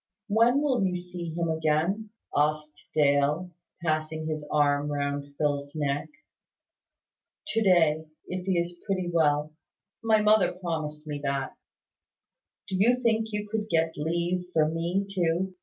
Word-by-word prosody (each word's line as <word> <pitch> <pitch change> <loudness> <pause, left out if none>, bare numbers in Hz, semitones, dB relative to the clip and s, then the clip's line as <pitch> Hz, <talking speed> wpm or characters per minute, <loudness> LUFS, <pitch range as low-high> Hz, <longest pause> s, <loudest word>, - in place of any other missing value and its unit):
"When 235 +7 +4
will 260 -7 +2
you 180 -1 0
see 175 -1 -6
him 170 +1 -1
again?" 160 +7 0 0.3
asked 150 0 0
Dale, 150 +4 +2 0.3
passing 155 -1 -1
his 155 -1 -3
arm 145 0 +2
round 140 0 -3
Phil's 145 -1 -1
neck. 145 -1 -1 1.4
"To 225 - +1
day, 160 -5 +3 0.2
if 185 0 -5
he 185 -2 +2
is 170 0 -2
pretty 185 -3 -1
well. 150 -2 +2 0.5
My 220 -1 +4
mother 215 -1 +4
promised 155 -4 -4
me 150 -1 -4
that." 140 -1 -2 1.1
"Do 190 - -2
you 230 +6 +5
think 225 -3 +1
you 210 0 -3
could 215 0 -3
get 165 -2 +2
leave 170 +4 -1
for 155 -1 +4
me 170 +5 -1
too? 185 -1 0
165 Hz, 140 wpm, -27 LUFS, 150-190 Hz, 1.4 s, you